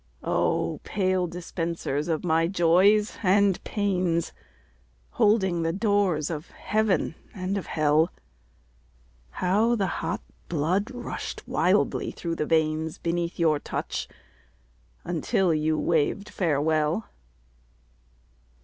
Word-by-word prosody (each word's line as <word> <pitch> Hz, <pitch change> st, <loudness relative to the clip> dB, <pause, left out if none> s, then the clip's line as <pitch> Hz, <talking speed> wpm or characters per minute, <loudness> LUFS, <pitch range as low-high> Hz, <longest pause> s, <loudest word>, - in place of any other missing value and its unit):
Oh, -, -, 0 dB
pale 185 Hz, -3 st, 0 dB
dispensers 165 Hz, -4 st, -3 dB
of 160 Hz, -2 st, -1 dB
my 165 Hz, -1 st, +2 dB
Joys 190 Hz, +4 st, +3 dB
and 200 Hz, -1 st, +3 dB
Pains, 180 Hz, -5 st, 0 dB, 0.8 s
Holding 190 Hz, -, +2 dB
the 165 Hz, 0 st, 0 dB
doors 195 Hz, -6 st, +1 dB
of 160 Hz, +1 st, -5 dB
Heaven 215 Hz, -5 st, 0 dB, 0.2 s
and 185 Hz, 0 st, -2 dB
of 200 Hz, -, -4 dB
Hell, 155 Hz, +2 st, +2 dB, 1.2 s
How 210 Hz, -, +2 dB
the 200 Hz, -4 st, 0 dB, 0.2 s
hot 165 Hz, 0 st, -2 dB, 0.3 s
blood 175 Hz, -, 0 dB
rushed 245 Hz, -2 st, -6 dB
wildly -, -, +1 dB
through 165 Hz, -1 st, -4 dB
the 150 Hz, -, -1 dB
veins 160 Hz, -1 st, +1 dB
Beneath 170 Hz, 0 st, -2 dB
your 155 Hz, -3 st, +3 dB
touch, -, -, -4 dB, 1.0 s
until 175 Hz, +1 st, +1 dB
you 155 Hz, 0 st, +1 dB
waved 165 Hz, +6 st, 0 dB
farewell. 155 Hz, +3 st, +1 dB
170 Hz, 105 wpm, -26 LUFS, 160-195 Hz, 1.2 s, Joys